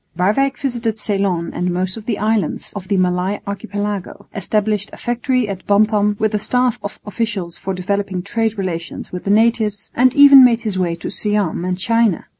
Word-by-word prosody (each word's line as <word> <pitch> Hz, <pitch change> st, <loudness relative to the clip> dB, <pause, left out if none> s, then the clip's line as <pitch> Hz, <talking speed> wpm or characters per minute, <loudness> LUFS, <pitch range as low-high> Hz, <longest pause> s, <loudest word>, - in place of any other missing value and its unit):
Waerwyck 215 Hz, +10 st, +1 dB
visited 235 Hz, -5 st, -2 dB
Ceylon 195 Hz, -5 st, -1 dB
and 180 Hz, +1 st, -1 dB
most 185 Hz, +1 st, -2 dB
of 225 Hz, -1 st, -10 dB
the 225 Hz, -, -1 dB
islands 215 Hz, -5 st, -1 dB
of 195 Hz, -3 st, -7 dB
the 200 Hz, 0 st, +1 dB
Malay 185 Hz, +2 st, 0 dB
Archipelago, 205 Hz, -1 st, -5 dB
established 210 Hz, +1 st, -1 dB
a -, -, -11 dB
factory 245 Hz, 0 st, -1 dB
at 195 Hz, -2 st, -6 dB
Bantam 210 Hz, 0 st, +3 dB
with 215 Hz, 0 st, 0 dB
a 210 Hz, -, +1 dB
staff 250 Hz, +2 st, +1 dB
of 205 Hz, -, -7 dB
officials 205 Hz, -4 st, -3 dB
for 190 Hz, 0 st, -4 dB
developing 190 Hz, 0 st, -2 dB
trade 225 Hz, +1 st, -1 dB
relations 175 Hz, -3 st, -5 dB
with 180 Hz, -, -6 dB
the -, -, -2 dB
natives, 215 Hz, -1 st, +1 dB
and 255 Hz, +1 st, +3 dB
even 280 Hz, -2 st, +9 dB
made 235 Hz, -2 st, +4 dB
his 210 Hz, -5 st, -3 dB
way 175 Hz, -2 st, 0 dB
to -, -, -6 dB
Siam 205 Hz, -5 st, -1 dB
and 180 Hz, 0 st, -2 dB
China. 230 Hz, -1 st, +1 dB
205 Hz, 185 wpm, -18 LUFS, 185-225 Hz, -, even